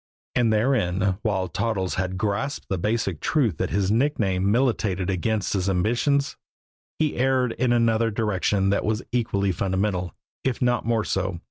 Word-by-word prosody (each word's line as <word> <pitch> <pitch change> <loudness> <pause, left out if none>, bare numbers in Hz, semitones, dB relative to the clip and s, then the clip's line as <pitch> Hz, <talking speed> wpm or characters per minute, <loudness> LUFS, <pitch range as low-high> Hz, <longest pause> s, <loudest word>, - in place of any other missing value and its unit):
And 120 -3 +2
therein, 100 -5 +1
while 95 -4 0
Toddles 95 +1 -1
had 95 0 -2
grasped 110 +8 -2
the 95 - -1
basic 105 -4 -1
truth 120 - +1
that - - -1
his 100 0 0
nickname 105 -7 +1
militated 105 -6 +1
against 105 +2 -1
his 95 -1 0
ambitions, 120 +9 +1 0.6
he 155 -2 0
erred 130 -1 +2
in 125 +1 0
another 115 -1 +3
direction 105 -2 0
that 100 - +1
was 110 +2 -1
equally 100 -5 0
fundamental, 95 0 -1 0.3
if 130 -2 -1
not 120 -2 +1
more 115 -2 +2
so. 95 -2 -2
105 Hz, 150 wpm, -24 LUFS, 95-120 Hz, 0.6 s, another